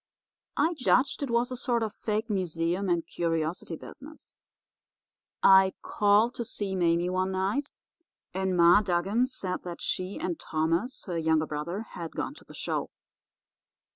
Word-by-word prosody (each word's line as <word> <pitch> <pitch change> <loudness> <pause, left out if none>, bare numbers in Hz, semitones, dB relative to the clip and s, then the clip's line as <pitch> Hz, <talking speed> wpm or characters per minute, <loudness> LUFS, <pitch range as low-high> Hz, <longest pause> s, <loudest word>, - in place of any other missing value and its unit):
I 320 +4 +3
judged 270 -2 +2
it 280 - -2
was 235 +2 +1
a - - -2
sort 240 -2 0
of 215 -2 -3
fake 215 +1 -2
museum 180 -1 -1
and 170 -1 +1
curiosity 165 0 -2
business. 300 - -12 1.0
I 190 0 +7
called 210 +3 +3
to 235 - -3
see 200 -3 -2
Mame 175 0 +2
one 185 +1 0
night, 200 +10 -1 0.6
and 190 -1 0
Ma 170 +4 +7
Dugan 195 +6 +1
said 185 -8 -2
that 175 -1 -7
she 185 +2 -2
and 175 -3 -3
Thomas, 165 +10 -1
her 175 -3 -2
younger 160 -1 +2
brother, 155 +7 -4
had 170 -2 -7
gone - - -3
to - - -15
the - - -14
show. - - -2
190 Hz, 150 wpm, -28 LUFS, 170-225 Hz, 1.0 s, I